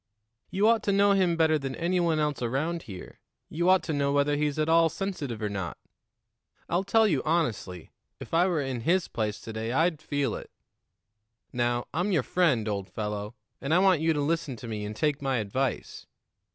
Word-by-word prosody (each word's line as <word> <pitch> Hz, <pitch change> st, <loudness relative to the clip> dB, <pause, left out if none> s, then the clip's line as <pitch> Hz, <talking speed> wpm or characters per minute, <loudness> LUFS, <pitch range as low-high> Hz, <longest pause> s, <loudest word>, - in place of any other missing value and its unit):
"You 200 Hz, +3 st, +2 dB
ought 230 Hz, 0 st, +4 dB
to 200 Hz, -, +2 dB
know 200 Hz, +1 st, +4 dB
him 185 Hz, -4 st, +2 dB
better 160 Hz, -1 st, +3 dB
than 135 Hz, -1 st, -4 dB
any 175 Hz, +2 st, 0 dB
one 170 Hz, -2 st, +2 dB
else 150 Hz, -3 st, -1 dB
around 145 Hz, +8 st, -1 dB
here; 95 Hz, -, -10 dB, 0.3 s
you 170 Hz, +3 st, 0 dB
ought 185 Hz, 0 st, +5 dB
to 160 Hz, -, -3 dB
know 140 Hz, -1 st, +1 dB
whether 145 Hz, +1 st, +2 dB
he's 150 Hz, 0 st, -1 dB
at 155 Hz, 0 st, +1 dB
all 165 Hz, 0 st, +5 dB
sensitive 145 Hz, -, -4 dB
or -, -, +1 dB
not. 95 Hz, -4 st, -4 dB, 0.9 s
I'll 175 Hz, +2 st, 0 dB
tell 220 Hz, +3 st, +4 dB
you 150 Hz, -9 st, +1 dB
honestly, 115 Hz, -, -1 dB, 0.3 s
if -, -, -10 dB
I 175 Hz, +3 st, +4 dB
were 165 Hz, -6 st, 0 dB
in 130 Hz, -3 st, -3 dB
his 175 Hz, +8 st, +2 dB
place 110 Hz, -2 st, -3 dB
to 110 Hz, -, -8 dB
day, 110 Hz, +1 st, -3 dB
I'd 160 Hz, +3 st, +1 dB
feel 145 Hz, -2 st, -1 dB
it. -, -, -7 dB, 1.0 s
Now, 120 Hz, 0 st, 0 dB
I'm 175 Hz, +7 st, 0 dB
your 160 Hz, -8 st, +2 dB
friend, 140 Hz, -12 st, +1 dB
old 100 Hz, -2 st, -3 dB
fellow, 105 Hz, +1 st, -4 dB, 0.3 s
and 140 Hz, +5 st, +1 dB
I -, -, +6 dB
want 185 Hz, -4 st, +4 dB
you 165 Hz, 0 st, +3 dB
to 150 Hz, -, -1 dB
listen 155 Hz, -2 st, -1 dB
to 115 Hz, +1 st, -9 dB
me 105 Hz, -2 st, -4 dB
and 105 Hz, +1 st, -6 dB
take 150 Hz, +2 st, 0 dB
my 135 Hz, -2 st, 0 dB
advice. 120 Hz, +5 st, -3 dB
150 Hz, 205 wpm, -27 LUFS, 120-170 Hz, 1.0 s, I